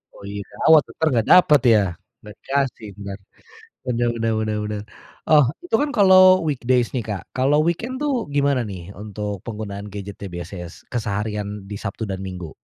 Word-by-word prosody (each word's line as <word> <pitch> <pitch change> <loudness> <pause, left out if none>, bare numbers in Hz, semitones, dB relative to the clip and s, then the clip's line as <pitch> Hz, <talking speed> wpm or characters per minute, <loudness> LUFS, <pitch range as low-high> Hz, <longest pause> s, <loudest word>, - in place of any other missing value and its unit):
Oh, - - -14
iya, 100 0 -5 0.2
awas 155 -3 +8
entar 160 - -1
nggak 115 -3 +1
dapet 150 -7 +6
ya, 105 - +6 0.4
nggak 105 -1 -11
dikasih, 135 -5 -1
bener. 100 -1 -6 0.7
Bener 120 -1 +1
bener 115 0 +1
bener 110 -1 -1
bener. 105 -1 -4 0.5
Oh, 150 -2 +8 0.2
itu 355 - 0
kan 295 - 0
kalo 190 -2 +6 0.3
weekdays 125 -3 +1
nih, 120 -3 -1
Kak, 100 -4 -4
kalo 130 +3 +2
weekend 225 +9 -1
tuh 290 -2 +1 0.2
gimana 140 -2 +2
nih 90 0 -8
untuk 105 -1 -5
penggunaan 105 -2 -6
gadget-nya 100 0 -7
biasanya 85 0 -6 0.2
keseharian 105 -3 -2 0.2
di - - -4
Sabtu 100 +2 -4
dan 95 - -4
Minggu? 90 -4 -7
110 Hz, 165 wpm, -22 LUFS, 100-135 Hz, 0.7 s, awas